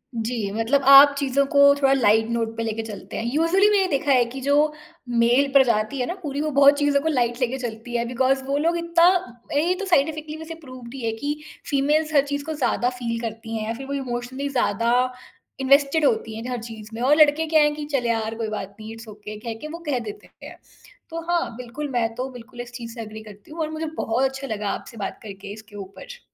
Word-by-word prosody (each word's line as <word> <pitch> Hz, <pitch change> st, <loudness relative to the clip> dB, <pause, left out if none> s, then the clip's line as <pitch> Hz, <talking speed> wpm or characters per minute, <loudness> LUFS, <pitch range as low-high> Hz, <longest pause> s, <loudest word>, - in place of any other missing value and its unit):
जी, 225 Hz, -3 st, -2 dB
मतलब 225 Hz, +6 st, +1 dB
आप 280 Hz, +1 st, +10 dB
चीज़ों 280 Hz, 0 st, +1 dB
को 280 Hz, 0 st, +1 dB, 0.2 s
थोड़ा 275 Hz, -1 st, +2 dB
लाइट 225 Hz, -3 st, +3 dB
नोट 225 Hz, -1 st, -2 dB
पे 230 Hz, -, -1 dB
लेके 225 Hz, 0 st, -2 dB
चलते 210 Hz, -3 st, -8 dB
हैं, -, -, -3 dB
यूज़ुअली 355 Hz, +7 st, +4 dB
मैंने 395 Hz, -3 st, +3 dB
देखा 285 Hz, -2 st, 0 dB
है 250 Hz, -2 st, +5 dB
कि 250 Hz, +3 st, -7 dB
जो 295 Hz, +2 st, +2 dB, 0.4 s
मेल 240 Hz, +4 st, +3 dB
प्रजाति 250 Hz, -1 st, +3 dB
है 250 Hz, -, 0 dB
ना -, -, -2 dB
पूरी 290 Hz, -2 st, -3 dB
वो 310 Hz, -, -1 dB
बहुत 280 Hz, +1 st, +6 dB
चीज़ों 290 Hz, -1 st, +2 dB
को 320 Hz, -, -2 dB
लाइट 240 Hz, -3 st, 0 dB
लेके 250 Hz, +2 st, 0 dB
चलती 240 Hz, -1 st, -6 dB
है 235 Hz, -, -1 dB
बिकॉज़ 265 Hz, +2 st, +1 dB
वो 280 Hz, +1 st, 0 dB
लोग 335 Hz, +3 st, +1 dB
इत्ता 335 Hz, 0 st, +2 dB, 0.5 s
ए 340 Hz, +4 st, +2 dB
तो 400 Hz, -, -3 dB
साइंटिफिकली 310 Hz, -2 st, 0 dB
वैसे 320 Hz, +1 st, -8 dB
प्रूफ़ 255 Hz, -3 st, -10 dB
भी 265 Hz, 0 st, -8 dB
है, 225 Hz, -, +1 dB
कि 295 Hz, +6 st, -4 dB, 0.3 s
फीमेल्स 300 Hz, +3 st, +1 dB
हर 280 Hz, -, +6 dB
चीज़ 285 Hz, 0 st, -3 dB
को 320 Hz, -, -3 dB
ज़्यादा 250 Hz, -3 st, 0 dB
फील 230 Hz, -1 st, -2 dB
करती 225 Hz, 0 st, -5 dB
हैं 215 Hz, 0 st, -4 dB
या 225 Hz, -, -1 dB
फिर 270 Hz, +3 st, -8 dB
वो 280 Hz, -, -4 dB
इमोशनली 260 Hz, +1 st, -4 dB
ज़्यादा 235 Hz, -3 st, +1 dB, 0.7 s
इन्वेस्टेड 280 Hz, +3 st, +3 dB
होती 220 Hz, -2 st, 0 dB
हैं 225 Hz, -, -6 dB
ज -, -, -6 dB
हर 245 Hz, -2 st, -3 dB
चीज़ 220 Hz, -2 st, -9 dB
में। 230 Hz, -, -6 dB
और 280 Hz, +4 st, +4 dB
लड़के 305 Hz, +1 st, +5 dB
क्या 315 Hz, -1 st, +4 dB
हैं 295 Hz, 0 st, +3 dB
कि 300 Hz, -1 st, -5 dB
चल 250 Hz, -3 st, +1 dB
यार, 225 Hz, -1 st, -1 dB
कोई 225 Hz, -1 st, -3 dB
बात 200 Hz, -2 st, -6 dB
नहीं 215 Hz, +1 st, -8 dB
इट्स 225 Hz, 0 st, -11 dB
ओके 210 Hz, 0 st, -9 dB
कह 230 Hz, 0 st, -5 dB
के 305 Hz, -, -5 dB
वो 335 Hz, +2 st, -7 dB
कह 255 Hz, -3 st, +1 dB
देते 215 Hz, -3 st, -9 dB, 0.2 s
हैं। -, -, -10 dB, 0.5 s
तो 330 Hz, 0 st, -5 dB
हाँ 340 Hz, -9 st, 0 dB
बिल्कुल 255 Hz, +4 st, -6 dB
मैं 235 Hz, -2 st, +1 dB
तो 255 Hz, +1 st, -3 dB
बिल्कुल 245 Hz, 0 st, -10 dB
इस 245 Hz, 0 st, -9 dB
चीज़ 230 Hz, -2 st, -7 dB
से 230 Hz, -, -7 dB
एग्री 215 Hz, 0 st, -8 dB
करती 210 Hz, +5 st, -14 dB
हूँ 330 Hz, -, -9 dB
और 310 Hz, -, -1 dB
मुझे 315 Hz, +1 st, -4 dB
बहुत 230 Hz, +4 st, 0 dB
अच्छा 265 Hz, +1 st, -7 dB
लगा 210 Hz, -3 st, -3 dB
आपसे 235 Hz, -, -6 dB
बात 200 Hz, -, -5 dB
करके 200 Hz, -1 st, -8 dB
इसके 215 Hz, 0 st, -13 dB
ऊपर। 205 Hz, -, -10 dB
255 Hz, 235 wpm, -23 LUFS, 225-290 Hz, 0.7 s, आप